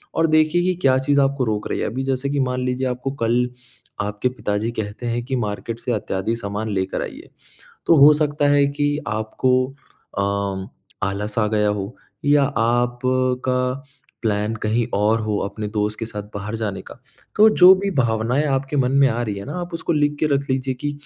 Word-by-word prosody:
और 165 0 +3
देखिए 155 +2 +3
कि 185 0 +2
क्या 130 -1 +4
चीज़ 140 +1 +2
आपको 135 -1 +1
रोक 105 -2 -2
रही - - -2
है। - - -1
अभी 130 +3 -3
जैसे 135 +1 -1
कि 145 0 -1
मान 125 -1 0
लीजिए 130 +1 -1
आपको 125 +2 -3
कल 120 +2 +2 0.5
आपके 105 +4 -1
पिताजी 110 -2 -2
कहते 110 +1 -5
हैं 120 0 -1
कि 130 0 -2
मार्केट 115 0 -3
से 125 - -3
अत्यादि 105 +1 -2
सामान 105 0 -4
लेकर 95 0 -1
आइए। - - -8 0.6
तो 165 - +5
हो 145 +2 +8
सकता 145 -1 +1
है 145 0 +4
कि 145 +1 0
आपको 110 +4 -1 0.7
अ, 100 -1 -1 0.4
आलस 105 +2 -4
आ 105 - +2
गया 105 -1 +1
हो 105 +2 -3 0.3
या 145 0 +5
आपका 125 +2 0 0.4
प्लान 105 0 0
कहीं 110 +2 +1
और 110 +3 +2
हो 105 -1 -1
अपने 105 +1 -4
दोस्त 105 +1 -2
के 115 - -3
साथ 105 -2 -6
बाहर 100 +2 -4
जाने 105 -3 -3
का, - - -12 0.4
तो 220 +1 +7
जो 185 -2 +8
भी 200 +1 -2
भावनाएँ 120 +2 +1
आपके 135 +1 -1
मन 130 -2 +2
में 140 0 +5
आ 120 +1 -1
रही 105 -4 -2
है 100 - -8
ना, 145 - -6
आप 175 0 -6
उसको 165 +1 -1
लिख 145 -1 +1
के - - +2
रख 140 0 -1
लीजिए 130 0 0
कि 145 +3 -4
125 Hz, 195 wpm, -21 LUFS, 105-140 Hz, 0.7 s, हो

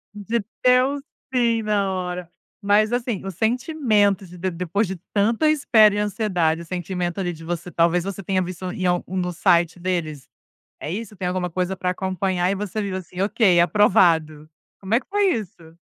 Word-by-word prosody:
De 215 +2 -2 0.2
deu 255 +3 +4 0.3
sim, 235 -3 +2
na 200 -2 0
hora. 180 -1 -4 0.3
Mas 210 +2 +3
assim, 240 -5 -2
o 195 - -3
sentimento 220 - +1
de 180 +1 -12
de 185 +1 -2
depois 180 +5 -1
de 190 - -4 0.2
tanta 225 +9 +2
espera 220 -9 +5
e - - -2
ansiedade, 190 -6 0
o 170 - -9
sentimento 180 0 -3
ali, 175 -2 -2
de 165 0 -12
você 175 +1 -5
talvez 170 +1 +2
você 195 0 -5
tenha 185 +1 0
visto 180 0 -5
em 185 - -4
algum 180 +1 0
do 180 0 -2
site 175 0 +2
deles, 165 -6 -3 0.5
é 150 - -5
isso? 215 0 -6
Tem 180 -1 -3
alguma 180 -1 -1
coisa 185 +2 -2
pra 180 0 -1
acompanhar 185 -1 -1
e 195 - +1
você 210 +1 -3
viu 195 -2 -3
assim, 185 0 -7
okay, 195 -4 +3
aprovado. 165 -5 +3 0.3
Como 195 +3 -2
é 235 - +4
que - - -24
foi 405 0 +2
isso? 170 - -7
190 Hz, 185 wpm, -22 LUFS, 175-210 Hz, 0.5 s, espera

